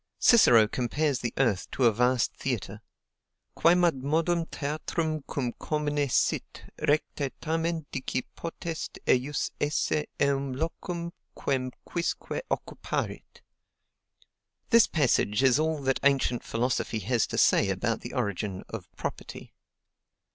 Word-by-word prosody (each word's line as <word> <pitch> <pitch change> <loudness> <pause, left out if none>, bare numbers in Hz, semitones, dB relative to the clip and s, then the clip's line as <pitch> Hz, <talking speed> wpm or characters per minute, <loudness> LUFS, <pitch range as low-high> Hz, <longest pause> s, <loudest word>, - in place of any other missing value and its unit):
Cicero 120 - +6
compares 130 +4 0
the 120 0 -2
earth 115 -8 +1
to 130 - +1
a 115 - +7
vast 125 +2 +2
theatre: - - -4 0.7
Quemadmodum 165 0 +2
theatrum 155 +1 -2
cum 125 -4 -2
commune 145 -2 -1
sit, - - 0 0.2
recte 145 -2 0
tamen 165 0 -1
dici 130 -1 -2
potest 165 -1 -5
ejus 135 +4 +1
esse 150 +1 0
eum 140 -1 +1
locum 170 +4 -4 0.2
quem 130 -2 -1 0.2
quisque 170 - -3
occuparit. - - -4 1.3
This 230 -1 +7
passage 130 -7 +2
is 130 +1 +5
all 160 0 0
that 135 0 +1
ancient 135 -3 +2
philosophy 115 -1 -1
has 115 +3 +1
to - - -4
say - - +4
about - - -1
the - - -7
origin 100 -1 -2
of - - -7
property. - - -6
140 Hz, 115 wpm, -28 LUFS, 125-160 Hz, 1.3 s, a